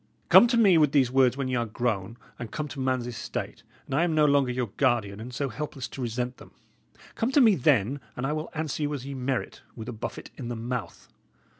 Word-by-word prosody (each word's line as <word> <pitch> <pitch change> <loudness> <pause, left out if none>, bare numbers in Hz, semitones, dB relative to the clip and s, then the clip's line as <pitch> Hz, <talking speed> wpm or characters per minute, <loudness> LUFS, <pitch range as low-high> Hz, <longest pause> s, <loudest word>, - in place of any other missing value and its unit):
Come 240 - +9
to 235 0 +1
me 195 -7 +6
with 150 -2 +3
these 130 -4 +3
words 130 -1 +4
when 135 -2 -2
y' 130 - -3
are 120 -1 -1
grown 115 -1 -2 0.2
and 120 -2 -5
come 150 +7 -4
to 140 - -8
man's 130 -2 0
estate, 120 -2 -5 0.2
and - - -7
I 150 +5 +3
am 170 -2 +1
no 155 -1 +5
longer 140 -3 +3
your 125 -2 -2
guardian, 105 -4 +1
and 120 +3 -7
so 135 +2 -2
helpless 135 +2 -5
to 135 - -8
resent 125 +1 -3
them. - - -15 0.6
Come 230 +3 -1
to 290 - +6
me 230 -6 +7
then, 135 - +2 0.2
and 125 - -2
I 150 - 0
will 155 +1 -4
answer 155 -1 -3
you 145 0 0
as 135 -2 -7
ye 140 - -5
merit, 130 -1 -3
with 110 0 -8
a 125 - -4
buffet 110 - -7
in 125 - -6
the 120 - -3
mouth. 115 -4 -5
130 Hz, 240 wpm, -27 LUFS, 120-150 Hz, 0.6 s, Come